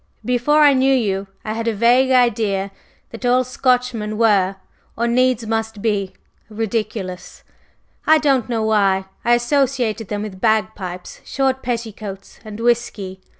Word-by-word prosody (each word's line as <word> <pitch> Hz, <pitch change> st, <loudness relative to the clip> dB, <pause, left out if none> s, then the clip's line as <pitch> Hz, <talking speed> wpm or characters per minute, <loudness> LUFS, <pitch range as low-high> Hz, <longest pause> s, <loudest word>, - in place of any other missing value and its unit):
Before 250 Hz, +5 st, +3 dB
I 290 Hz, -1 st, +6 dB
knew 265 Hz, +1 st, +3 dB
you 200 Hz, -5 st, -1 dB, 0.2 s
I 215 Hz, -, -2 dB
had 230 Hz, +1 st, -4 dB
a 225 Hz, -, 0 dB
vague 245 Hz, +5 st, +4 dB
idea 215 Hz, -6 st, +2 dB, 0.4 s
that 230 Hz, -, -10 dB
all 250 Hz, +1 st, +3 dB
Scotchmen 250 Hz, -4 st, -1 dB
were, 200 Hz, -4 st, +3 dB, 0.4 s
or 235 Hz, -, 0 dB
needs 250 Hz, -1 st, +2 dB
must 225 Hz, -1 st, -2 dB
be, 200 Hz, -3 st, -1 dB, 0.4 s
ridiculous, 215 Hz, -4 st, -4 dB, 0.6 s
I 315 Hz, +1 st, +7 dB
don't 275 Hz, -6 st, +1 dB
know 225 Hz, -2 st, -1 dB
why. 200 Hz, -3 st, +2 dB, 0.2 s
I 240 Hz, 0 st, +4 dB
associated 240 Hz, -3 st, 0 dB
them 210 Hz, 0 st, -3 dB
with 190 Hz, -3 st, -8 dB
bagpipes, 215 Hz, -5 st, -2 dB
short 265 Hz, -1 st, -1 dB
petticoats 220 Hz, -5 st, -6 dB
and 215 Hz, -1 st, -9 dB
whisky. 220 Hz, -5 st, -1 dB
225 Hz, 140 wpm, -19 LUFS, 205-250 Hz, 0.6 s, I